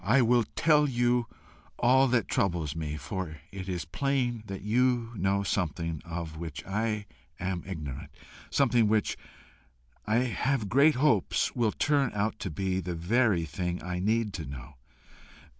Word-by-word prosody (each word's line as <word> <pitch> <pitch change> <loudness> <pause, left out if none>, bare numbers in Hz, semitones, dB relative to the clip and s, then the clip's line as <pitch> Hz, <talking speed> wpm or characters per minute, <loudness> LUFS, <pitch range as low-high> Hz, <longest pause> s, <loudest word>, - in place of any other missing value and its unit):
I 125 +5 +4
will 120 0 +3
tell 150 -2 +4
you 120 -1 +1 0.5
all 130 +2 +5
that 120 -4 +1
troubles 85 -6 0
me, 75 -2 -3
for 80 +2 -5
it 95 -1 -6
is 90 -2 -3
plain 130 -4 -1
that 95 -1 -6
you 120 +1 +2
know 100 0 +1
something 85 -4 -2
of 80 -2 -6
which 80 -4 -6
I 105 +1 -1 0.3
am 90 -1 -2
ignorant, 75 -8 -6 0.4
something 120 -5 +3
which, 105 0 +1 0.9
I 105 - +2
have 125 0 -1
great 140 +5 +5
hopes, 125 -7 +2
will 115 -3 +2
turn 145 +1 +1
out 105 +1 -1
to - - -3
be 95 +3 -1
the 90 -1 -4
very 95 0 +2
thing 90 +3 -3
I 90 0 -3
need 105 +2 +1
to 80 - -5
know. 70 0 -9
100 Hz, 150 wpm, -29 LUFS, 85-120 Hz, 0.9 s, all